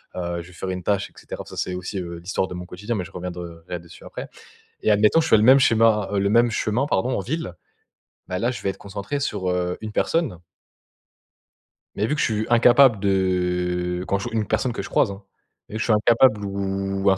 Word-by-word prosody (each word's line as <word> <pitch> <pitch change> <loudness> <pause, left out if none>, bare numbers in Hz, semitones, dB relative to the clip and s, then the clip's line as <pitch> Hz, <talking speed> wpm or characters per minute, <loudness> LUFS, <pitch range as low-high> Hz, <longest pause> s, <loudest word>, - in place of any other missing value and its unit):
Heu, 85 -1 -3
je 85 - -12
vais 90 - -15
faire 95 +1 -5
une 90 -1 -4
tâche, 100 +1 0
et - - -29
cetera. - - -8
Ça, - - -11
c'est 90 - -2
aussi, 95 +1 -4
heu, 85 -1 -6
l'histoire 95 +2 -2
de - - -8
mon 90 0 -6
quotidien, 105 +6 -5
mais 95 - -2
je 85 - -11
reviendrais 90 -1 -7
dessus 85 0 -15
après - - -7 0.5
et - - +2
admettons, 105 +9 +4
je 160 - -1
fais - - +6
le 105 - +2
même 130 +4 +8
schéma, 115 -5 +3
heu, 100 - +1
le 100 0 +1
même 120 +2 +4
chemin, 110 +5 0
pardon, 130 -1 0
en - - -1
ville. 130 - -4 0.8
Bah, 90 0 -2
là, 120 +5 +1
je 125 - -7
vais 100 - -1
être 95 - -5
concentré 100 +8 -5
sur, 100 -9 -2
heu, 90 0 -1
une 110 - -5
personne. 140 - 0 1.6
Mais 105 - +1
vu 150 - 0
que 150 - -2
je - - +3
suis 110 0 -1
incapable 120 -1 +6
de 90 -2 0
quand 100 - 0
je 100 - -4
une 110 -2 0
personne 125 +4 0
que - - -4
je - - -8
croise, - - +2
hein 100 +1 -9 0.5
et 110 - -6
je - - -1
suis 115 - +2
incapable 110 0 +4
ou 95 0 -1
un 95 - +3
100 Hz, 230 wpm, -23 LUFS, 90-110 Hz, 1.6 s, même